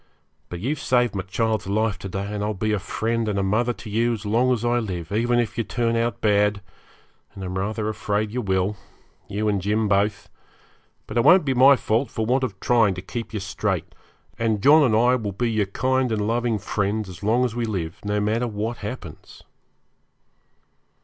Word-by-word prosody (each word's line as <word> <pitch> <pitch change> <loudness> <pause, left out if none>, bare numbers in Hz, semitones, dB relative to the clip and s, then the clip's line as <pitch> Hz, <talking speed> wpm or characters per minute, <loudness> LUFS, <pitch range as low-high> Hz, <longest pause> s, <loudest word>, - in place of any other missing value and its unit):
But 90 - -6
you've 135 - -2
saved 120 -3 +2
my 100 - -2
child's 110 +2 -1
life 105 0 0
to 95 - -6
day, 100 +3 -4
and 105 -1 -2
I'll 105 0 -2
be 110 +3 -1
a 105 - +1
friend 115 +3 -2
and 100 - -1
a 100 - +1
mother 110 +5 +1
to 110 - -11
you 115 +3 +1
as 110 -1 -6
long 120 +5 +2
as 120 -2 0
I 120 0 +2
live, 90 -6 -5
even 120 +3 +1
if 115 -2 -1
you - - +2
turn 115 0 -1
out 115 -2 -1
bad, 105 -1 +2 0.8
and 95 - -7
I'm 90 0 -4
rather 105 +3 -2
afraid 105 0 -1
you 125 +2 -2
will 95 0 0 0.5
you 105 +2 -2
and 100 -2 +1
Jim 105 +3 0
both 100 0 +1 0.8
but 110 - -5
it 120 - +4
won't 180 +2 +6
be 135 - +1
my 135 +3 +7
fault 115 +2 0
for 110 - -2
want 130 +3 +1
of 100 -7 -3
trying 110 -5 +3
to 90 - -6
keep 115 +3 -6
you 110 - -3
straight; 95 - -3 0.5
and 110 -3 0
John 155 +3 +7
and 125 -7 +3
I 120 +3 +4
will 105 -4 -4
be 115 +4 -1
your 105 -3 +1
kind 130 +4 0
and 105 -2 0
loving 115 0 0
friends 105 +1 -2
as 90 -3 -10
long 115 +5 +2
as 120 - -2
we 120 -1 -1
live, 85 -7 -4
no 105 0 0
matter 110 +4 0
what 110 +2 -3
happens.' 105 -7 -9
110 Hz, 210 wpm, -23 LUFS, 100-120 Hz, 0.8 s, my